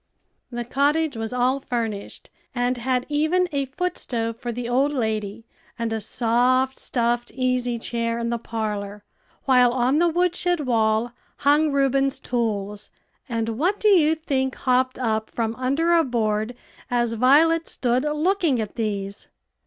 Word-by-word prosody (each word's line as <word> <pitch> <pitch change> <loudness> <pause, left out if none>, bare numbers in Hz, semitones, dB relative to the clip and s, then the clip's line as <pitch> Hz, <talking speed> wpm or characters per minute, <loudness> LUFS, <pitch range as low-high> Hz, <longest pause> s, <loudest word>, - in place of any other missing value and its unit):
The 240 0 -4
cottage 290 +4 +1
was 225 -1 -4
all 250 +2 +1
furnished, 225 -6 -4 0.2
and 245 +1 +1
had 250 +1 -1
even 315 +5 +1
a 280 -2 -1
foot 355 +7 -3
stove 230 -2 -3
for 240 +1 -5
the 240 0 -4
old 265 +4 +2
lady, 220 -4 -2 0.3
and 230 -1 -2
a 220 - -2
soft, 250 +4 +1
stuffed 240 0 -1
easy 250 -2 0
chair 230 0 -2
in 235 0 -2
the 235 - -1
parlor, 210 -3 -4 0.4
while 250 -2 +5
on 255 +4 +2
the 345 - +4
woodshed 355 0 0
wall 225 -2 +1 0.3
hung 295 +2 +3
Reuben's 275 0 +1
tools; 210 -5 -3 0.4
and 230 -1 -1
what 375 +7 +1
do 430 - +3
you 320 -5 +5
think 265 -5 -1
hopped 255 0 +1
up 220 -3 -1
from 225 -1 -2
under 280 +7 +1
a 335 -1 +5
board 220 -2 -1 0.3
as 240 -1 +1
Violet 305 +8 +4
stood 250 +1 0
looking 305 -1 +1
at 215 -2 -5
these? 200 -3 -3
250 Hz, 150 wpm, -23 LUFS, 230-285 Hz, 0.4 s, while